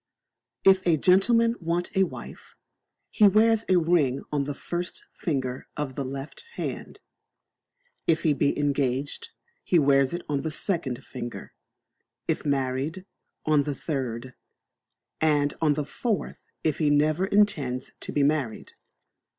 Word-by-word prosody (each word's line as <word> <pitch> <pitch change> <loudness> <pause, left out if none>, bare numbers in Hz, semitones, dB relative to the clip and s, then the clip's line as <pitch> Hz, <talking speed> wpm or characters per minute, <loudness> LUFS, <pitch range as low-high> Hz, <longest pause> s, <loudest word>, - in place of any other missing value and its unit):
If 190 -1 +6
a 165 -2 +4
gentleman 230 +7 +4
want 170 +2 -2
a 190 0 +4
wife, - - -10 0.6
he 210 - +6
wears 220 +2 +4
a 185 - +5
ring 160 -6 +2
on 145 -2 0
the 145 0 -4
first 175 +4 -5
finger 130 -5 -3
of 145 -3 -3
the 140 - -3
left 135 - -7
hand; - - -5 1.1
if 160 -1 +2
he 155 - +4
be 140 - +1
engaged, 140 -1 -1 0.3
he 180 - +3
wears 140 -3 +4
it 175 - -6
on 145 -2 -1
the 160 - -2
second 150 -6 -2
finger; 120 -2 -7 0.7
if - - -1
married, 140 +6 -1 0.4
on 155 -2 +4
the 140 0 -3
third; 130 -5 -4 0.9
and 145 -2 +2
on 150 -3 +3
the 150 -1 -2
fourth 220 - -3 0.2
if 155 -2 0
he 155 -2 +3
never 155 +5 +2
intends 150 -12 +1
to - - -5
be 145 - +1
married. 140 -6 -1
150 Hz, 140 wpm, -26 LUFS, 135-175 Hz, 1.1 s, If